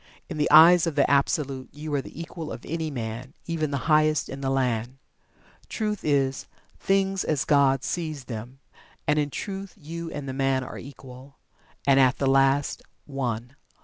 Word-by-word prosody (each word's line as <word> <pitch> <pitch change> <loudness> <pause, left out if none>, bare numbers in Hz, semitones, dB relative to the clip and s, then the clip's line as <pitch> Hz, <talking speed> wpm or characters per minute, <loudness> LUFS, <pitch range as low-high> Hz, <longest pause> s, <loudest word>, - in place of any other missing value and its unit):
In 165 - -5
the 150 - +2
eyes 170 +3 +8
of 160 - -2
the 140 - +3
Absolute 140 -1 0
you 150 +1 -6
are 140 - +1
the 140 - -11
equal 165 -1 -6
of - - -8
any 160 0 -3
man, 120 +1 -6
even 160 -3 -1
the 140 -2 -3
highest 155 -1 +3
in 135 +1 -7
the 135 - -1
land. 125 -2 -1 0.7
Truth 210 -2 -2
is 135 -3 0 0.3
"Things 195 -1 +1
as 150 -4 0
God 135 -2 +3
sees 155 -5 -3
them" 120 +2 -7 0.5
and 150 +1 +3
in 145 -1 0
Truth 195 +4 -6
you 165 0 -7
and 145 -3 -6
the 130 - -4
man 135 -1 +1
are - - -8
equal, 135 0 -12 0.5
and, 135 -1 +5
at 130 -1 +4
the 140 - -1
last, 135 +1 +2 0.2
One. 125 -2 -4
140 Hz, 175 wpm, -26 LUFS, 135-155 Hz, 0.7 s, eyes